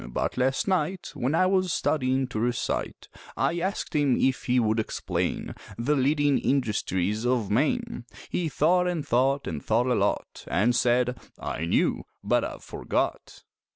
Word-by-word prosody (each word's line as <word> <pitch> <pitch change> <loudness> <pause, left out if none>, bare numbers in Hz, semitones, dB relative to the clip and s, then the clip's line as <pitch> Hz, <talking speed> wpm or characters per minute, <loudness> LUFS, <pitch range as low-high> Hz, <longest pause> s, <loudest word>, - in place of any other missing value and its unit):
But - - -2
last 130 +6 +1
night 185 -1 -1
When 130 +6 -1
I 185 - +4
was 185 -1 +2
studyin' 130 -5 +1
to 110 - -3
recite 120 +1 -2 0.3
I 170 - +1
asked 190 +3 -3
him 145 -4 +3
if 130 0 +1
he 125 0 +3
would 110 -1 +1
explain 110 - -2 0.2
The 130 +6 +1
leading 145 +1 +2
industries 105 -5 0
of 120 -5 0
Maine 155 - 0 0.2
He 170 -3 -1
thought 180 +6 +2
an' 175 -4 -1
thought 135 +3 +1
an' 80 -2 -3
thought 115 +9 +1
a 125 - +2
lot, - - -1
An' 115 +5 +2
said, 125 +1 +2 0.2
"I 80 - -4
knew, 85 - +1 0.2
but - - +2
I've - - -6
forgot." - - -3
130 Hz, 155 wpm, -26 LUFS, 120-155 Hz, 0.3 s, I